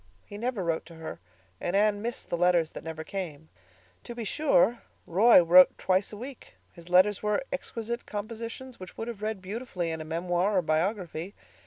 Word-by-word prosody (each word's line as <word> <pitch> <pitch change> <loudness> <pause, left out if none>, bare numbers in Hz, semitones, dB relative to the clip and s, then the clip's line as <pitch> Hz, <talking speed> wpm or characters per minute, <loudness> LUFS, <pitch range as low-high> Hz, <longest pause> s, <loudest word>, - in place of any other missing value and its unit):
He - - -10
never 230 -2 -2
wrote 165 -1 -1
to 165 - -12
her, 160 - -7 0.4
and 175 - -2
Anne 205 0 +3
missed 235 +2 -5
the - - +2
letters 175 -2 +3
that - - -8
never 160 -1 -6
came. 160 -4 -6 0.6
To 240 - -7
be 235 - -4
sure, 240 - +2 0.2
Roy 195 +2 +6
wrote 180 +2 +7
twice 190 +1 +1
a 210 - -8
week; 255 +3 -10 0.2
his 170 -1 -14
letters 185 +3 +4
were 210 +2 0
exquisite 235 -3 -4
compositions 230 +4 -6
which 185 - -10
would 225 - -4
have 230 -4 -6
read 215 -3 -3
beautifully 190 -4 -4
in 160 0 -4
a - - -4
memoir 175 +5 0
or 180 - +2
biography. 175 +2 -1
195 Hz, 185 wpm, -28 LUFS, 170-225 Hz, 0.6 s, wrote